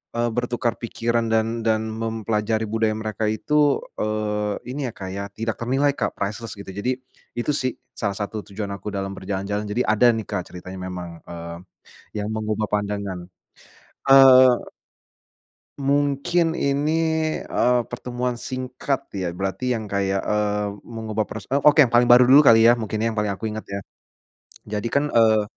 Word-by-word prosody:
eee, 120 0 +1
bertukar 120 0 -1
pikiran 115 0 -1
dan 110 +1 +1
dan 110 -1 0
mempelajari 110 -1 -1
budaya 110 0 0
mereka 110 0 -2
itu, 145 +6 +2 0.2
eee, 105 -1 -1 0.2
ini 135 0 -3
ya, - - -4
Kak, 95 -1 -7
ya, 100 +1 -4
tidak 115 +2 -3
ternilai 135 +4 +2
Kak, 140 - -3
priceless 105 +3 -4
gitu. 100 -1 -9
Jadi 105 +7 -1 0.4
itu 120 +5 -1
sih, 130 -4 -1 0.2
salah 100 -2 -3
satu 105 +2 -4
tujuan 100 0 -5
aku 100 +1 -7
dalam 95 0 -3
berjalan-jalan, 100 +2 -3
jadi 110 +5 0
ada 110 +3 +4
nih, 110 - -3
Kak, 100 -4 -4
ceritanya 95 +1 -8
memang, 90 -2 -7
eee, 85 0 -7 0.7
yang - - -3
mengubah 110 -1 -2
pandangan. 100 -3 -2 0.8
Eee 130 -2 +7 1.1
mungkin 145 +4 +1
ini, 140 +2 0 0.5
eee, 125 0 +2
pertemuan 125 0 -3
singkat 130 +1 -4
ya, 95 -3 -2
berarti 95 +6 -1
yang 110 - -5
kayak, 100 -1 0
eee, 105 -1 0
mengubah 110 -2 -4
pros 105 -2 -7
oke, 145 +1 +5
yang 120 - -4
paling 120 0 +5
baru 125 +1 +8
dulu 135 +4 +8
kali 115 -6 +7
ya, 115 - +8
mungkin 110 -1 -3
yang 115 - +1
paling 105 -1 -1
aku 110 - -9
ingat 110 0 -6
ya. 100 0 -4 0.9
Jadi 105 +1 -2
kan, 140 - +3
eee, 110 -3 +4
110 Hz, 155 wpm, -23 LUFS, 105-125 Hz, 1.1 s, baru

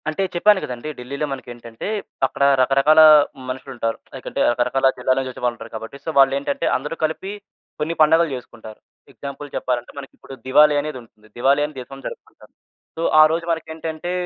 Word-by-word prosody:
అంటే 155 +5 -3
చెప్పాను 205 +3 +4
కదండీ! 125 +4 -6
ఢిల్లీలో 140 +4 -4
మనకేంటంటే, 120 -3 -8 0.4
అక్కడ 140 - -3 0.2
రకరకాల 135 +4 +4 0.5
మనుషులుంటారు. 125 -3 -4 0.2
లైకంటే, - - -6
రకరకాల 125 +3 +1
జిల్లాల 130 +1 +1
నుంచొచ్చే 130 -1 -6
వాళ్ళుంటారు 115 -2 -3
కాబట్టి. 115 +5 -8
సో, - - -3
వాల్లేంటంటే, 140 +1 +2
అందరూ 150 +5 -6
కలిపి 160 +5 -2 0.5
కొన్ని 160 +2 -2
పండగలు 160 +2 +5
చేసుకుంటారు. 115 -3 -11 0.3
ఎగ్జాంపుల్ 140 +1 -8
చెప్పాలంటే 120 -1 -2
మనకిప్పుడు 135 -1 -11
దివాలీ 150 +3 +5
అనేదుంటుంది. 125 -7 -9
దివాలీ 135 +4 +3
అని 150 -2 -9
దేశంలో 135 +2 -10
జరుపుకుంటారు. - - -12 0.5
సో, - - -3 0.2
ఆరోజు 160 +2 +3
మనకేంటంటే, 160 +1 -4
135 Hz, 140 wpm, -21 LUFS, 125-155 Hz, 0.5 s, పండగలు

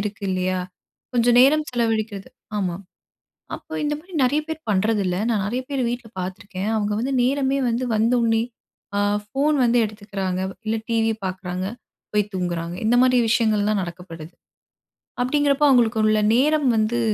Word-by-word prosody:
இருக்கு 205 0 -5
இல்லையா? 185 0 0 0.6
கொஞ்ச 235 -1 +2
நேரம் 300 +4 +5
செலவழிக்கிறது 220 -4 -1 0.3
ஆமா. 180 -4 -1 0.8
அப்போ - - -12
இந்த 295 0 0
மாரி 360 +3 -17
நெறைய 285 +4 +2
பேர் 320 0 -4
பண்றதில்ல. 200 -2 +1
நான் 210 -4 0
நெறைய 245 +5 -2
பேர் 275 -2 -1
வீட்ல 240 -1 -5
பாத்துருக்கேன். 190 +2 -5
அவங்க 210 -1 -1
வந்து 270 +3 -1
நேரமே 270 +2 +1
வந்து 235 +2 -1
வந்தோனே, 225 0 +2 0.5
அ, - - +2 0.3
ஃபோன் 280 +7 +1
வந்து 240 +1 +3
எடுத்துக்குறாங்க, 200 -3 -4 0.3
இல்ல 220 +1 +1
டிவி 225 -1 +2
பாக்குறாங்க, 185 0 -4 0.5
போய் 210 -1 +1
தூங்குறாங்க. 175 -2 -3
இந்த 240 - +4
மாரி 255 -1 +4
விஷயங்கள்லாம் 215 -2 +2
நடக்கப்படுது. 170 -2 -9 0.9
அப்டீங்கிறப்போ 290 +2 +2
அவங்களுக்கு 235 -4 +3
உள்ள 215 0 +3 0.2
நேரம் 295 +2 +3
வந்து 220 +2 +1
220 Hz, 140 wpm, -22 LUFS, 195-250 Hz, 0.9 s, நேரம்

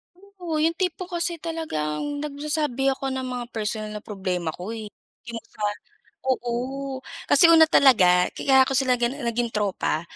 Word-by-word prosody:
Oo, 365 -4 -5
yung 325 +2 +2
tipo 365 -1 -2
kasi 345 -1 -2
talagang 290 - -3
nagsasabi 290 -2 -1
ako 270 0 -4
ng 260 0 -3
mga 250 -1 -4
personal 215 -1 -3
na 210 - -6
problema 185 -5 -3
ko, 180 +5 -7
eh. 225 -1 -5 0.4
Yung 230 -1 -5 0.2
kal 210 -1 -2 0.5
oo. 260 +2 -2 0.3
kasi 285 - +6
una 320 -1 +7
talaga, 180 - +6
kaya 265 -1 +4
ko 270 - -2
sila 260 -1 +2
ganun 245 +4 -1
naging 235 -1 -1
tropa, 200 -6 -1
260 Hz, 155 wpm, -24 LUFS, 215-300 Hz, 0.5 s, una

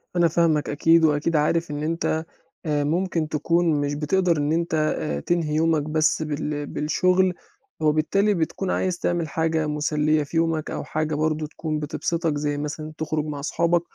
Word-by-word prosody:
أنا 175 -1 +4
فاهمك 160 -2 +1
أكيد 165 +3 +4
وأكيد 155 +2 +1
عارف 155 +2 +1
إن 145 0 -3
أنت 160 0 -1 0.4
آآ 150 -2 +1
ممكن 165 +1 0
تكون 160 0 +1
مش 145 0 -1
بتقدر 170 +3 +1
إن 145 0 0
أنت 170 +1 0 0.3
آآ 75 -2 -2
تنهي 160 - -1
يومك 160 -1 +2
بس 155 +1 +1
بال 150 -1 -3
بالشغل، 180 +6 +1 0.5
وبالتالي 160 +7 +2
بتكون 180 +2 -2
عايز 180 -2 -1
تعمل 175 -2 0
حاجة 160 0 0
مسليّة 150 0 +1
في 145 +3 -4
يومك 165 -2 0
أو - - -4
حاجة 155 0 -2
برضه 155 0 0
تكون 155 0 -4
بتبسطك 160 +1 -1
زي 145 0 -1
مثلًا 155 +1 -5
تخرُج 155 -1 -2
مع 145 -2 -5
صحابك، 170 +3 +1
155 Hz, 165 wpm, -24 LUFS, 150-165 Hz, 0.5 s, أنا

